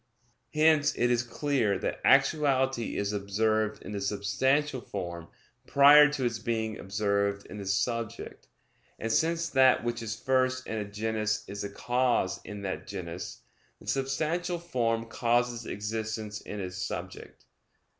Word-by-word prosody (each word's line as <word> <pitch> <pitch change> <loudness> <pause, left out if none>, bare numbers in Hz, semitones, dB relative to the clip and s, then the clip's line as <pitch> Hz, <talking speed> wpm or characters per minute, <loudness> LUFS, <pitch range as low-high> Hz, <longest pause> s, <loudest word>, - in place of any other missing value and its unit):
Hence 155 -1 +4
it 120 0 +2
is 120 -1 +3
clear 120 -4 0
that - - -3
actuality 135 -5 +3
is 100 +1 -1
observed 110 +2 0
in - - -7
the 100 -1 -4
substantial 120 +8 0
form 85 -5 -6 0.4
prior 145 +1 +8
to 135 -4 -1
its 115 -2 -1
being 110 -2 -2
observed 100 0 -1
in 105 - -9
the 100 - -6
subject: 115 +4 -2 0.5
and 115 - -3
since 165 +6 +1
that 130 -3 +4
which 120 0 -2
is 110 -1 -4
first 130 +2 +1
in 110 - -3
a 105 - -3
genus 110 +1 -2
is 100 +1 -6
the 100 - -4
cause 120 -3 0
in 105 -1 -8
that 95 -1 -4
genus, 90 -3 -6 0.4
the - - -16
substantial 155 +7 -1
form 115 -9 -1
causes 120 0 0
existence 110 0 -4
in 105 - -7
its 90 -1 -5
subject. 95 - -6
115 Hz, 145 wpm, -29 LUFS, 100-130 Hz, 0.5 s, prior